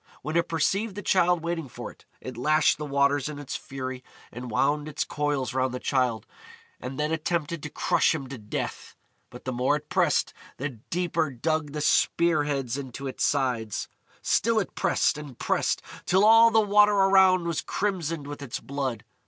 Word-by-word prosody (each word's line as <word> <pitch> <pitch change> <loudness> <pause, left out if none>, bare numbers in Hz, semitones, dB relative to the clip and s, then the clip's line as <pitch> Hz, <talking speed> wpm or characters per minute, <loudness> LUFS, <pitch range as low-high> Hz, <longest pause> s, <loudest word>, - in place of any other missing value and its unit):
When 155 +4 -4
it 170 0 +2
perceived 190 +6 0
the 205 - -6
Childe 180 -3 +3
waiting 170 -3 -3
for - - -7
it, - - -22 0.2
it 130 - -7
lashed 150 +7 +2
the 150 - -4
waters 140 0 +2
in 150 - -6
its 145 -1 -6
fury 130 -1 -6 0.3
and 125 +1 -7
wound 145 +6 +1
its 155 - -2
coils 145 -4 -2
round 130 -1 0
the - - -4
Childe, 125 -5 0 0.5
and 130 +2 -6
then 150 +1 0
attempted 160 0 -2
to 150 - -6
crush - - +2
him 140 -4 -5
to 135 -3 -7
death. 105 -1 -5 0.3
But 125 - -12
the 130 - -2
more 125 +4 +2
it 150 0 -7
pressed, - - +1 0.2
the 140 +3 -2
deeper 165 +6 -2
dug 150 +3 -2
the 150 - -3
spear 165 0 +2
heads 135 -3 -2
into 135 0 -7
its 130 - -3
sides. 125 -7 0 0.3
Still 230 0 +2
it 195 - -4
pressed 165 - +1
and 145 -5 -10
pressed, - - 0 0.2
till 190 +3 +4
all 225 +1 +8
the 225 0 +4
water 210 0 +5
around 190 -2 +5
was 170 -2 -1
crimsoned 170 -7 -2
with 145 0 -7
its 140 -4 -5
blood. 135 -5 -4
150 Hz, 185 wpm, -26 LUFS, 130-170 Hz, 0.5 s, all